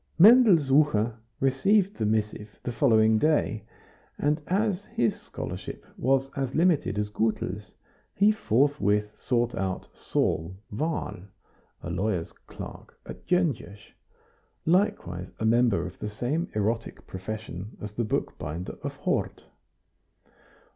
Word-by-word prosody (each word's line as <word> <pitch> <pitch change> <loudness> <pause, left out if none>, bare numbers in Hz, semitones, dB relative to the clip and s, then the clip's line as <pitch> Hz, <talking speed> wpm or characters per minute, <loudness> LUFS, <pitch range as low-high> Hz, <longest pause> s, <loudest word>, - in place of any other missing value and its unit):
Mendel 220 +1 +8
Sucher 135 -6 +3 0.3
received 190 +10 +2
the 110 -3 0
missive 105 -1 -2
the 120 - -2
following 110 -2 +4
day, 150 -8 +1 0.5
and 150 +2 +1
as 200 0 0
his 115 -3 0
scholarship - - -7
was 135 +1 +1
as 135 -2 -2
limited 160 - +2
as 105 0 -1
Gutel's, 105 -3 -2 0.4
he 205 +2 +5
forthwith 110 - +1
sought 120 -1 0
out 95 -1 -3
Saul 80 +4 -1 0.2
Wahl, 155 +9 -2 0.7
a - - -4
lawyer's 95 -4 -1
clerk - - -11
at - - -10
Gyongos, 140 - -1 0.7
likewise 90 - +1
a 110 - -1
member 115 -6 +3
of 90 - -9
the 105 - -3
same 130 +11 -2
erotic 110 +2 -2
profession 100 0 -7
as 105 - -6
the 120 - -1
bookbinder 85 -5 -3
of - - -5
Hort. - - -2
115 Hz, 120 wpm, -27 LUFS, 105-150 Hz, 0.7 s, Mendel